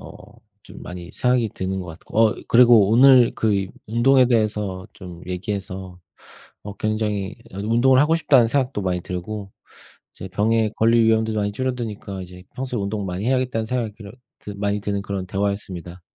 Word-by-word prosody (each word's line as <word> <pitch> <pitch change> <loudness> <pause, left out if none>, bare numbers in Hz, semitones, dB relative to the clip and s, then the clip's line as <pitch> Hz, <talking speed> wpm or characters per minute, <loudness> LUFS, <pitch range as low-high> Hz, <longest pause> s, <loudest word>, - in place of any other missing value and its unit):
어 - - -13 0.3
좀 - - -12
많이 90 -1 -8
생각이 125 -3 +1
드는 95 0 -4
것 90 - -8
같고. 80 +6 -7
어 110 -1 +4
그리고 120 -4 +6
오늘 125 +1 +6
그 110 -1 +1
이 95 -1 -1 0.2
운동에 125 +4 +4
대해서 105 -5 -1
좀 90 -3 -10
얘기해서 95 -1 -5 0.6
어 105 - -7
굉장히 105 -2 -2 0.2
이 - - -15
아 - - -5
운동을 120 +5 +3
하고 150 +3 +3
싶다는 135 -7 +4
생각도 130 -3 0
많이 90 -2 -1
들고 95 +3 -6 0.6
이제 - - -8
병에 110 +3 +1
걸릴 115 +1 +4
위험도 110 0 +2
많이 105 -1 -1
줄어드니까 110 -5 -4
이제 90 0 -12
평소에 125 -3 -3
운동 100 +1 -3
많이 90 +4 -4
해야겠다는 125 -3 0
생각이 115 -3 -2
그런 105 0 -11 0.3
드 - - -9
많이 100 0 -1
드는 100 0 -2
그런 100 -2 -4
대화였습니다. 95 -3 -4
105 Hz, 370 characters per minute, -22 LUFS, 95-115 Hz, 0.6 s, 그리고